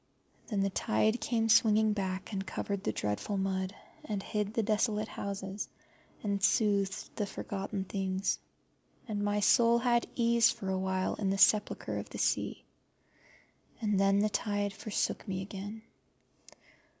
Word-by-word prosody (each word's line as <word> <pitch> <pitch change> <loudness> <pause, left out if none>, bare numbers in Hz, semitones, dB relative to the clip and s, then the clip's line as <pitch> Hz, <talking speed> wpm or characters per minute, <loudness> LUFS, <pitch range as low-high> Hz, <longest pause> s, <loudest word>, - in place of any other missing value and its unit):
Then 205 -4 0
the 195 0 +1
tide 215 - +1
came 225 -2 +1
swinging 220 -1 +5
back 190 0 -3
and 195 -1 -1
covered 195 +1 -3
the - - 0
dreadful 105 - -2
mud, 190 0 -1 0.3
and 205 -8 -3
hid 210 -1 -2
the 225 - +2
desolate 215 0 +1
houses, 200 0 -5 0.5
and 200 -2 -1
soothed 200 -2 +1
the 210 - -1
forgotten 195 0 -4
things, 190 0 -1 0.7
and 210 -2 -2
my 205 0 +1
soul 235 +2 +5
had 240 0 +2
ease 235 -1 +4
for 190 - -3
a 190 0 0
while 190 0 0
in 200 -2 -1
the 195 - +1
sepulture 210 +1 +3
of - - -7
the - - -7
sea. - - 0 1.1
And 210 -4 +1
then 195 0 +4
the 210 +1 +3
tide 205 -1 -1
forsook 215 +2 -2
me 190 -1 -2
again. 205 +3 -7
205 Hz, 150 wpm, -31 LUFS, 195-215 Hz, 1.1 s, swinging